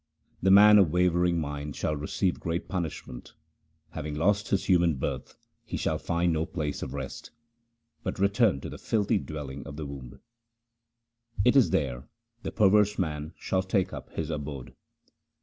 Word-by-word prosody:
The 95 - +3
man 105 +2 +8
of 95 -5 +5
wavering 90 0 +2
mind 75 -1 -4
shall 75 - -1
receive 85 +5 -1
great 85 0 -3
punishment: 80 -8 -5 0.6
Having 75 -1 -5
lost 100 +6 +1
his 100 - 0
human 85 -4 +3
birth 65 - -4 0.3
he - - -5
shall - - -1
find 85 0 0
no 80 0 0
place 75 -4 -3
of 65 - -5
rest, 65 -1 -6 0.7
But - - -4
return 100 - +2
to - - -6
the - - -8
filthy 105 -1 +1
dwelling 70 -5 -7
of - - -8
the 80 - -4
womb: 65 -3 -9 1.3
It 125 - +5
is 135 -4 +6
there 65 -2 -1 0.3
the - - -4
perverse 105 0 +4
man 80 -3 -3
shall 95 - 0
take 95 0 0
up - - -8
his 80 0 -3
abode. 70 -5 -6
85 Hz, 160 wpm, -28 LUFS, 75-95 Hz, 1.3 s, man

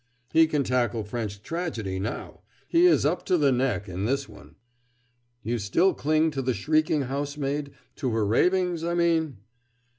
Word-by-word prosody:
"He 160 0 +6
can 150 -3 0
tackle 120 -3 0
French 105 -2 -5
tragedy 120 - -3
now 105 +5 -5 0.3
he 345 +1 +5
is 345 - +4
up 165 +5 0
to 180 - +3
the 145 -4 +3
neck 125 -5 0
in 95 +2 -4
this 135 +3 -1
one." 100 -2 -15 0.9
"You 120 +2 -1
still 165 - +2
cling 155 +2 +1
to 135 -2 -3
the 130 -2 -1
shrieking 155 +6 +1
housemaid 140 +1 -3 0.2
to 135 -3 -1
her 110 -2 0
ravings, 180 - +2
I 170 +1 -1
mean?" 165 -6 +1
140 Hz, 160 wpm, -26 LUFS, 115-160 Hz, 0.9 s, He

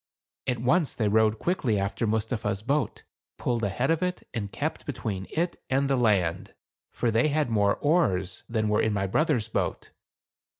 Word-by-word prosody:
At 125 -2 +1
once 140 +7 +2
they 110 - +1
rowed 110 +1 +3
quickly 130 - 0
after 100 +4 -1
Mustapha's 110 -1 -1
boat, 140 -1 -1 0.3
pulled 120 -2 -1
ahead 120 - +1
of 165 +1 +1
it, 180 0 -2
and 100 -4 -3
kept - - -3
between 95 -3 -4
it 170 +2 -2
and 135 +1 +2
the 135 - +2
land; 95 -8 +1 0.3
for 120 - -1
they 115 +6 +3
had 150 -4 0
more 100 -2 +3
oars 100 - +1
than 110 -2 0
were 105 0 +2
in 110 - +1
my 100 -1 0
brother's 125 - +1
boat. 110 - -2
115 Hz, 170 wpm, -27 LUFS, 105-140 Hz, 0.3 s, rowed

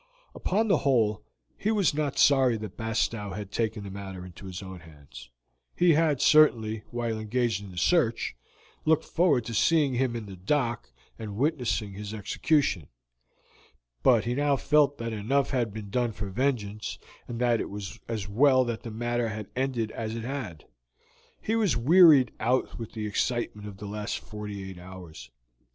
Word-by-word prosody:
Upon 215 +4 0
the 190 -7 +3
whole, 115 -6 +2 0.3
he 210 - -2
was 205 -7 +2
not 145 -2 -2
sorry 130 -4 +5
that 110 -1 -7
Bastow 110 -2 -2
had 100 0 -6
taken 110 -2 -2
the 100 - -7
matter 95 -2 -7
into 90 +2 -11
his 95 +1 -7
own 95 -1 -8
hands; 75 -7 -14 0.5
he 175 -1 +5
had, 150 -3 +2
certainly, 110 -8 +4
while 115 -2 -2
engaged 115 -1 -1
in 100 - -9
the 90 - -12
search, 120 - +1 0.5
looked 160 0 +2
forward 150 -9 +2
to 115 - -5
seeing 150 +3 +3
him 125 -1 0
in 115 -2 -5
the 100 -2 -9
dock 115 - -1 0.3
and 105 -2 -6
witnessing 115 - 0
his 105 +2 -6
execution, 110 - 0 1.1
but 115 - +4
he 120 - 0
now 145 +1 +2
felt 145 +1 +3
that 115 -1 -4
enough 130 +7 0
had 120 -5 0
been 105 -1 -8
done 120 0 0
for 100 -1 -5
vengeance, 110 -3 -2 0.3
and 120 -1 -5
that 120 -2 +2
it - - -4
was 100 +2 -7
as 110 -4 -3
well 130 +5 +4
that 120 -2 -3
the 115 - -7
matter 120 +1 -1
had 105 -2 -6
ended 125 -4 -1
as 110 0 -4
it 115 - -5
had. 120 - -5 0.7
He 220 - -1
was 210 - +2
wearied 145 -1 +6
out 125 +3 0
with 115 - -7
the 110 -2 -4
excitement 105 0 -2
of 100 -2 -9
the 105 - -8
last 105 +1 -3
forty 105 -2 -7
eight 95 -2 -9
hours. 90 -8 -11
115 Hz, 175 wpm, -27 LUFS, 105-135 Hz, 1.1 s, wearied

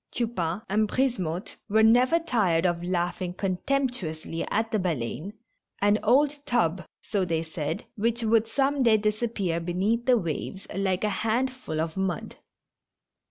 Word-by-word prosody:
Tupain 210 -5 -2
and 215 +2 +2
Brisemotte 200 -10 -1
were 220 +2 +4
never 245 +8 +5
tired 205 - +1
of 175 -1 0
laughing 175 0 -2
contemptuously 185 - -2
at 225 +1 0
the 215 - +1
Baleine^ 170 - -3 0.5
an 205 +1 +3
old 280 +6 +3
tub, 185 -7 +1 0.2
so 205 -3 0
they 165 -2 0
said, 160 -1 -4
which 230 +2 0
would 225 0 +3
some 275 +3 +1
day 230 -3 +5
disap 215 +2 -1
pear 175 -5 0
beneath 195 +8 -1
the 250 -1 +6
waves 185 +1 -4
like 190 -1 0
a 210 - +2
handful 240 -5 -1
of 160 +2 -2
mud. 190 -4 -2
205 Hz, 145 wpm, -27 LUFS, 175-235 Hz, 0.5 s, the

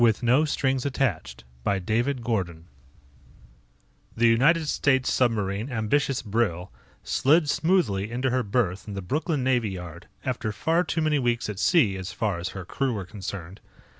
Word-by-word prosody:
David 115 -1 +4
Gordon 120 - +1
Illustrated 135 -2 +1 0.7
by 100 - +1
Schelling 110 - -1 1.5
The 120 - +3
United 150 +8 +4
States 130 -3 +2
Submarine 110 -1 0
Ambitious 130 +4 0
Brill 100 -5 -1 0.3
slid 155 +3 +3
smoothly 145 - +1
into 125 +2 -1
her 130 0 +1
berth 100 -3 -1
in 105 - -6
the 95 - -5
Brooklyn 150 - -1
Navy 125 -4 +1
Yard 90 -4 -8 0.2
after 110 - -2
far 160 +11 +1
too 165 - -2
many 155 -2 +2
weeks 120 -3 0
at 100 - -8
sea, 115 - +3
as 95 0 -6
far 105 -6 -1
as 90 +1 -3
her 95 - -6
crew 135 +7 -1
were 100 -4 -4
concerned. 95 -2 -7
115 Hz, 150 wpm, -26 LUFS, 100-135 Hz, 1.5 s, David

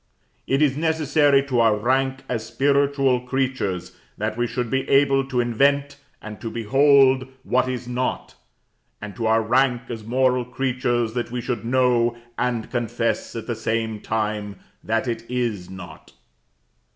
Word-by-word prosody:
It 135 +3 +2
is 140 -3 +2
necessary 150 -3 +2
to 130 -3 -1
our 115 -2 +4
rank 130 +4 0
as 115 -3 -2
spiritual 135 +2 +2
creatures, 125 -9 -2 0.3
that 105 +1 -2
we 120 +1 0
should 120 -1 -3
be 135 0 -1
able 135 0 +4
to 130 -2 -1
invent 140 +4 +1 0.3
and 105 -1 -9
to 115 - -4
behold 135 +3 +4 0.2
what 130 0 +1
is 125 -1 -4
not; 125 +1 -3 0.7
and 105 -2 -8
to 115 -2 -2
our 110 0 +3
rank 125 +1 +2
as 115 -3 -6
moral 125 +2 +1
creatures 120 -2 -1
that 120 -1 -3
we 125 +1 -4
should 120 0 -3
know 120 -1 +2 0.2
and 120 -3 -2
confess 120 -1 -2
at 115 - -5
the 120 - -2
same 110 -1 -2
time 105 -2 -3 0.3
that 115 +3 -1
it 115 -1 -3
is 120 -7 -2
not. 95 0 -11
125 Hz, 150 wpm, -23 LUFS, 115-135 Hz, 0.7 s, our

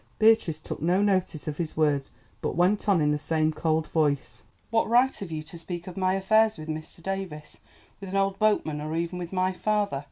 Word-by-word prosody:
Beatrice 220 -8 +4
took 155 - -7
no 175 +4 +2
notice 185 -7 0
of 150 -1 -3
his 165 -2 -3
words, 145 -3 +1 0.3
but - - -2
went 190 +5 +2
on 185 -5 +4
in 150 0 +3
the 150 - 0
same 155 +1 0
cold 160 0 0
voice. 145 -4 0 0.3
"What 225 -1 +2
right 250 +3 +4
have 195 - -6
you 155 -1 -4
to 165 +2 -10
speak 175 0 -6
of 185 - -8
my 185 0 +1
affairs 215 +2 +3
with 155 0 -8
Mr. 155 +2 -6
Davies, 190 -6 -5 0.4
with 195 - -8
an 190 - -4
old 195 0 +1
boatman, 180 -8 +1
or 155 +1 -3
even 170 +2 -2
with 175 -1 -6
my 185 0 +1
father? 205 -6 0
175 Hz, 215 wpm, -27 LUFS, 155-195 Hz, 0.4 s, Beatrice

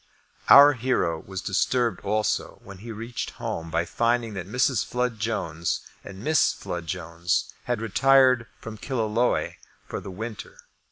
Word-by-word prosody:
Our 145 +1 +10
hero 120 - 0
was 95 0 -7
disturbed 120 +4 0
also 105 +1 -1
when 100 -1 -11
he 115 +3 -8
reached 115 +2 -5
home 80 0 -4
by 85 - 0
finding 115 +3 0
that 90 -2 -6
Mrs. 125 +1 +1
Flood 125 -2 -2
Jones 85 -7 -2 0.2
and 95 +2 -10
Miss 155 +1 +3
Flood 85 -1 -6
Jones 85 0 -2
had 120 -2 -1
retired 130 +2 +4
from 110 -1 -9
Killaloe 120 -2 0 0.3
for - - -4
the - - -9
winter. 110 +3 -7
110 Hz, 145 wpm, -25 LUFS, 95-125 Hz, 0.3 s, Our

